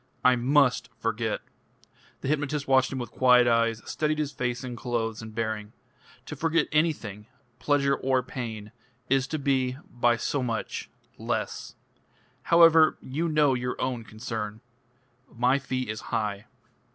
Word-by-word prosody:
"I 125 0 +7
must 130 +2 +2
forget." - - -2 0.8
The - - -4
hypnotist 145 0 -1
watched 130 -1 +4
him 135 - -3
with 120 -2 -5
quiet 125 -1 +5
eyes, 115 -1 +2
studied 155 0 -1
his 150 -2 -1
face 125 -2 -3
and 125 -2 -5
clothes 115 -2 -2
and 110 -1 -10
bearing. 110 -2 -3 0.5
"To - - -6
forget 165 0 +1
anything 130 - -1 0.3
pleasure 140 -1 +2
or 130 -1 +1
pain 110 -4 -6 0.4
is 135 0 +2
to 155 - -2
be, 135 -3 0
by 120 -1 +2
so 140 +3 -1
much 115 -3 -3 0.3
less. - - -3 0.7
However, 165 -2 +6
you 155 +6 -2
know 150 -3 +3
your 125 0 -3
own 125 -3 -2
concern. 110 -1 -6 0.7
My 125 +4 +2
fee 130 -1 -3
is 105 +1 -4
high." 105 -2 -3
125 Hz, 140 wpm, -27 LUFS, 115-140 Hz, 0.8 s, I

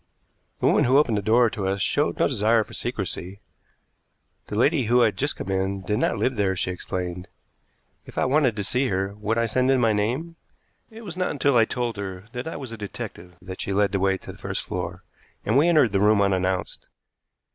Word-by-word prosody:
The - - -1
woman - - +4
who 130 +3 +4
opened 135 -7 +3
the - - -4
door 115 +4 +4
to 100 -4 -3
us 100 +1 -1
showed 145 +9 0
no - - +3
desire 115 -3 +2
for 105 - -15
secrecy. 100 -4 -4 1.1
The - - -5
lady 135 +4 +3
who 120 +3 +4
had 110 -4 +3
just 145 +8 -1
come 95 - -5
in 95 0 -1
did 105 +2 -1
not - - +1
live 120 +4 0
there, 95 -2 +1
she 90 0 -1
explained. 90 0 -5 0.8
If - - -13
I - - +2
wanted 135 -4 +2
to 105 - -2
see 125 +6 0
her, 95 -1 -1
would 105 +2 -2
I 115 - +2
send 125 +3 +1
in 135 -1 +4
my 115 -3 +3
name? 130 +11 -2 0.5
It 225 0 -12
was 180 -6 -7
not 185 0 -1
until 140 -2 +1
I 115 -2 +6
told 120 -1 -3
her 95 -2 -6
that 125 +3 -5
I 160 - -5
was 130 -4 -7
a 115 - -7
detective 90 -3 -8
that 95 0 -7
she 100 - -2
led 100 0 +2
the 100 - 0
way 95 0 +2
to - - -10
the - - -15
first - - -3
floor, - - -5 0.4
and 110 - +1
we 145 +5 +5
entered 150 - +4
the 100 - +1
room 105 +1 +4
unannounced. 95 -2 -1
110 Hz, 220 wpm, -24 LUFS, 95-130 Hz, 1.1 s, I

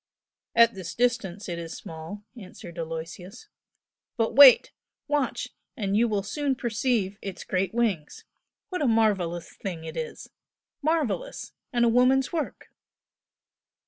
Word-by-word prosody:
"At 230 0 +6
this 185 -3 -7
distance 230 -6 0
it 170 -2 -4
is 165 -1 -6
small" 165 +5 -8
answered 185 -5 -10
Aloysius 165 - -7 0.7
"But 225 -1 +1
wait! 270 0 +9 0.4
Watch, 290 -3 -1 0.3
and 200 -4 -1
you 235 +3 +4
will 205 -3 -1
soon 280 +6 -1
perceive 225 -4 -1
Its 195 -2 -6
great 185 0 -1
wings! 215 -10 -1 0.4
What 365 -3 -3
a 285 - +2
marvellous 200 -7 +1
thing 175 -5 -6
it 160 0 -7
is! 160 -1 -6 0.5
Marvellous! 320 - -1 0.2
and 240 -2 +3
a - - +4
woman's 255 +4 +3
work!" 315 -4 -4
210 Hz, 130 wpm, -26 LUFS, 175-250 Hz, 0.7 s, wait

